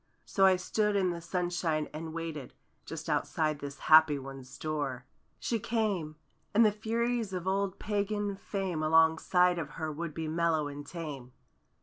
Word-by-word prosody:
So 195 -1 +4
I 190 - +6
stood 210 +3 0
in 185 -2 +2
the 170 -1 -5
sunshine 175 -3 -1
and 160 +1 -5
waited— 160 -4 -6 0.3
Just - - -6
outside 155 -2 0
this 140 0 -6
happy 155 -2 +7
one's 135 -1 -9
door. 145 -5 -3 0.3
She 230 - -1
came! 205 -9 -1 0.4
And 225 +2 +7
the 210 - +5
Furies 225 0 -1
of 180 -1 -3
old 195 0 0
Pagan 205 -1 -1
fame 190 -4 -3
Alongside 160 +3 +4
of 155 -4 -4
her 160 -1 -2
would 155 0 -5
be 160 -1 -3
mellow 160 -1 +1
and 145 0 -8
tame. 145 -7 -7
165 Hz, 155 wpm, -31 LUFS, 155-195 Hz, 0.4 s, happy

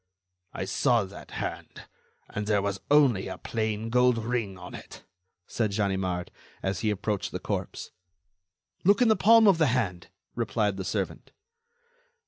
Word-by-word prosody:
"I - - -4
saw 120 +3 +2
that 95 +1 -11
hand, - - -6 0.4
and 105 +1 -5
there 105 -2 +2
was 100 -1 -2
only 140 -9 +4
a - - -6
plain 110 0 -3
gold 125 0 +4
ring 115 -4 -2
on 90 -1 -10
it," - - -11 0.4
said 110 -4 -1
Ganimard, 95 -3 -1 0.3
as 95 -2 -1
he 110 - 0
approached 105 0 -2
the - - -4
corpse. - - -4 0.9
"Look 200 +6 +5
in 235 - +4
the 220 - +5
palm 225 +3 +6
of 190 -4 +5
the 160 - +4
hand," 105 -9 -1 0.3
replied 105 -2 -1
the 95 - -3
servant. - - -4
110 Hz, 150 wpm, -27 LUFS, 95-125 Hz, 0.9 s, palm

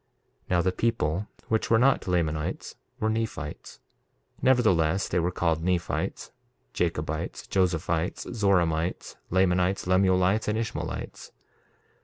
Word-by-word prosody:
1:13 - - -32
Now 90 -1 +3
the 95 - +2
people 95 -3 -1 0.2
which 110 0 0
were 115 - +5
not 130 -1 +3
Lamanites 80 -4 -1 0.3
were 110 - 0
Nephites; 110 -9 -4 0.6
nevertheless, 95 -9 +3
they 90 - 0
were 85 +1 +1
called 85 -2 0
Nephites, 90 -1 -2 0.4
Jacobites, - - -2
Josephites, 85 -2 0
Zoramites, 90 -6 +1
Lamanites, 95 +1 +2
Lemuelites, 95 +2 +3
and 105 +1 0
Ishmaelites. 115 -1 -5
90 Hz, 110 wpm, -27 LUFS, 85-105 Hz, 0.6 s, were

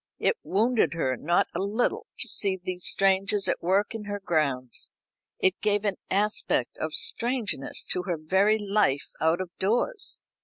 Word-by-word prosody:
It - - +1
wounded 220 0 +1
her 130 -6 0
not 170 +7 +1
a 170 - -3
little 205 +5 -1
to - - +1
see 195 -2 +2
these 180 0 -3
strangers 195 +1 +2
at - - -1
work 195 +5 +1
in 220 -2 -6
her 205 0 -4
grounds. 140 - -1 0.4
It 185 0 +1
gave 205 0 +1
an 200 -2 0
aspect 210 +2 +2
of - - -3
strangeness 240 - 0
to 180 - +2
her 175 -3 -1
very 190 +7 +2
life 200 -9 0
out 160 +2 +2
of 185 -2 -5
doors. 235 - 0
195 Hz, 160 wpm, -26 LUFS, 175-210 Hz, 0.4 s, see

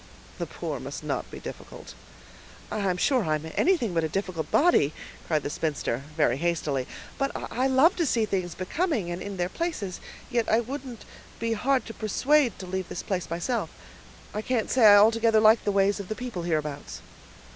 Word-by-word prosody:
"The - - -2
poor - - -5
must - - -7
not - - -3
be - - -9
difficult." - - -9 0.8
"I'm 195 -4 0
sure 255 +4 +2
I'm 155 -1 -1
anything 310 - +2
but 165 -1 +1
a 160 - -1
difficult 185 -3 -3
body," 275 - +4 0.3
cried 155 -3 +1
the - - -2
spinster, 145 -6 -2 0.2
very 135 -5 +3
hastily; 150 -5 -1 0.3
"but 275 0 +1 0.2
I 255 +2 +2
love 270 +7 +5
to 340 -3 +1
see 230 -3 +2
things 185 -5 -2
becoming, 215 - -1
and 175 +1 -4
in 200 -1 -6
their 175 0 0
places; 220 - -3 0.3
yet 235 -2 +1
I 220 - +4
wouldn't 255 -1 -6 0.3
be 230 0 -1
hard 260 +4 +1
to 225 - -7
persuade 255 +3 +2
to 190 - -7
leave 185 0 -4
this - - -5
place 185 -3 -3
myself. 175 +9 -2 0.6
I 210 - -2
can't 230 -1 -1
say 245 -4 +6
I 205 - +10
altogether 220 +1 +5
like 215 +1 +5
the 205 - +2
ways 200 +1 +2
of 200 - -6
the 215 - -3
people 245 -7 -5
hereabouts." 155 -4 -3
205 Hz, 185 wpm, -27 LUFS, 175-245 Hz, 0.8 s, I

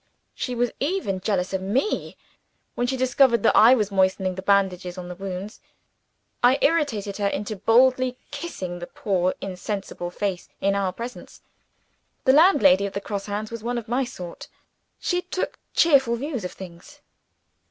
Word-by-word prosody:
She 250 - -4
was 240 0 0
even 280 - -1
jealous 190 -1 -1
of 190 - -1
me, 240 - -1 0.6
when 245 - -1
she 265 +1 -1
discovered 255 -1 +3
that - - +4
I 235 +4 +8
was 210 -4 -1
moistening 190 -1 +1
the 190 - -6
bandages 190 -2 +1
on 180 -1 -6
the - - -5
wound. 195 +2 -6 0.8
I 250 +2 +5
irritated 260 -11 +1
her 205 -1 0
into 210 +2 -3
boldly 250 +5 +3
kissing 240 - -5
the 175 - -7
poor 185 -3 -1
insensible 190 -1 -5
face 185 0 -3
in 200 0 +1
our 195 -2 0
presence! 235 +6 -9 0.8
The 260 - +6
landlady 205 - +5
of 200 - -9
the 200 - -2
Cross 200 0 -5
Hands 210 +2 -4
was 230 -2 -7
one 240 +1 -2
of 235 - -5
my 245 +4 +1
sort: 180 -9 -8 0.5
she 355 -1 0
took 365 +1 -4 0.2
cheerful 270 -7 +4
views 260 -2 -4
of 180 - -4
things. 190 +11 -12
210 Hz, 165 wpm, -24 LUFS, 190-255 Hz, 0.8 s, I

